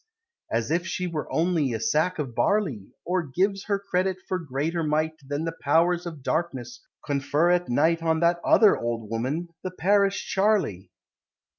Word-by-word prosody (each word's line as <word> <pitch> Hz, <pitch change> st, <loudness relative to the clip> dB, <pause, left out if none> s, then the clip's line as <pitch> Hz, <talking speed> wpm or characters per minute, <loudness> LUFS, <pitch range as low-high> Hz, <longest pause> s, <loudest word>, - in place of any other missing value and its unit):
As 115 Hz, +4 st, -1 dB
if 170 Hz, +2 st, 0 dB
she 180 Hz, -, -2 dB
were 165 Hz, -4 st, -4 dB
only 160 Hz, -6 st, +1 dB
a 110 Hz, -, -2 dB
sack 180 Hz, -4 st, +1 dB
of 140 Hz, -6 st, -4 dB
barley! 145 Hz, -, 0 dB, 0.2 s
Or 180 Hz, +1 st, +1 dB
gives 190 Hz, +7 st, -1 dB
her 200 Hz, -2 st, +1 dB
credit 190 Hz, -1 st, -1 dB
for 185 Hz, -, -1 dB
greater 160 Hz, +2 st, -2 dB
might 155 Hz, +1 st, 0 dB
Than 145 Hz, +3 st, -3 dB
the 165 Hz, -, -3 dB
Powers 170 Hz, +4 st, +2 dB
of 155 Hz, -5 st, -8 dB
Darkness 130 Hz, -8 st, -3 dB, 0.2 s
confer 145 Hz, +4 st, +1 dB
at 180 Hz, 0 st, +1 dB
night 160 Hz, +7 st, +2 dB
On 160 Hz, -1 st, +1 dB
that 170 Hz, 0 st, +3 dB
other 215 Hz, -3 st, +6 dB
old 115 Hz, -2 st, -4 dB
woman, 135 Hz, +10 st, -2 dB
the 185 Hz, -, -2 dB
parish 195 Hz, +2 st, +1 dB
Charley! 190 Hz, -, +1 dB
165 Hz, 165 wpm, -25 LUFS, 140-180 Hz, 0.2 s, other